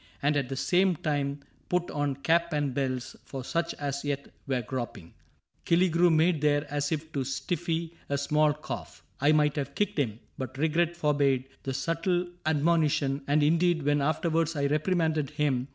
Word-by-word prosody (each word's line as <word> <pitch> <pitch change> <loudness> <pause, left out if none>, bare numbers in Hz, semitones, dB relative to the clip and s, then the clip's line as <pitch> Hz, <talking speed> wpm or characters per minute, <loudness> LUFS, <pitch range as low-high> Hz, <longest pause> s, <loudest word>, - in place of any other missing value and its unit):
And 145 +1 +1
at 140 -3 0
the 135 - -3
same 180 +6 +2
time 145 -2 -2 0.3
put 180 -1 0
on 145 -2 -1
cap 170 +4 +1
and 145 -3 0
bells 130 -2 -2
For 135 -2 -6
such 170 +4 -1
as 140 -1 -3
yet 140 -1 -3 0.2
were 130 -3 0
groping? 115 -8 -5 0.3
" - - -43
Killigrew 175 0 +4
Made 160 0 +3
there 145 0 +2
as 145 +1 -1
if 160 0 -3
to 140 -3 -1
stifle 165 +5 -2 0.2
a 140 - +1
small 150 +2 +3
cough. 150 +1 -7 0.2
I 145 +2 +4
might 150 -1 +3
have 140 - -3
kicked 205 -5 0
him, 115 -5 -1 0.2
but 130 0 -5
regret 165 +3 +1
forbade 140 -4 +1
The 135 -1 -3
subtle 170 +5 0 0.2
admonition; 150 -3 +2
and 145 +1 +3
indeed 165 +1 +3
When 145 0 +2
afterwards 165 +2 +1
I 140 -1 0
reprimanded 155 -1 +1
him. 145 -4 0
150 Hz, 170 wpm, -28 LUFS, 140-165 Hz, 0.3 s, Killigrew